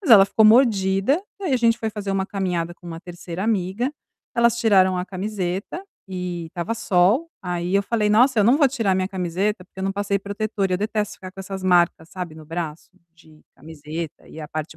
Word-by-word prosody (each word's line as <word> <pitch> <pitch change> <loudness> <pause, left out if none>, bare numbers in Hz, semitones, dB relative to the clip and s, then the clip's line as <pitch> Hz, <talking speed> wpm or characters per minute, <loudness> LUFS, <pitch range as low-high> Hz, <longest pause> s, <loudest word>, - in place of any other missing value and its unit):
Mas 335 - -2
ela 200 -3 +10
ficou 220 +2 +3
mordida, 215 - +4 0.2
e - - -6
aí 330 - 0
a 255 - +4
gente 230 -1 +3
foi 220 -1 -2
fazer 205 -2 -5
uma 190 -1 0
caminhada 180 -4 -2
com 175 - -16
uma 165 -1 -7
3º 175 +1 -7
amiga, 215 +5 0 0.4
elas 235 0 +3
tiraram 190 -5 +4
a 180 - -2
camiseta, 195 - -4 0.3
e 180 -2 -4
estava 175 +6 -4
sol, 225 - +2
aí 180 +1 -2
eu 200 - +4
falei: 210 0 0
"Nossa, 240 +3 +4
eu 205 - +5
não 245 +6 +5
vou 295 - +5
tirar 225 -7 0
a - - +2
minha 185 0 0
camiseta, 185 +2 -2
porque 190 - -12
eu - - -3
não 195 - 0
passei 200 0 -1
protetor", 205 0 -2
eu 180 - +2
detesto 210 0 -2
ficar 185 -1 -9
com 195 - -9
essas 190 0 -6
marcas, 175 -3 +2
sabe, 180 -4 -6
no 155 -1 -12
braço, 165 -1 -5 0.3
de 155 -2 -20
camiseta 155 +2 -7
e 160 - -10
a 150 - -6
parte 155 0 -5
195 Hz, 215 wpm, -23 LUFS, 175-215 Hz, 0.4 s, ela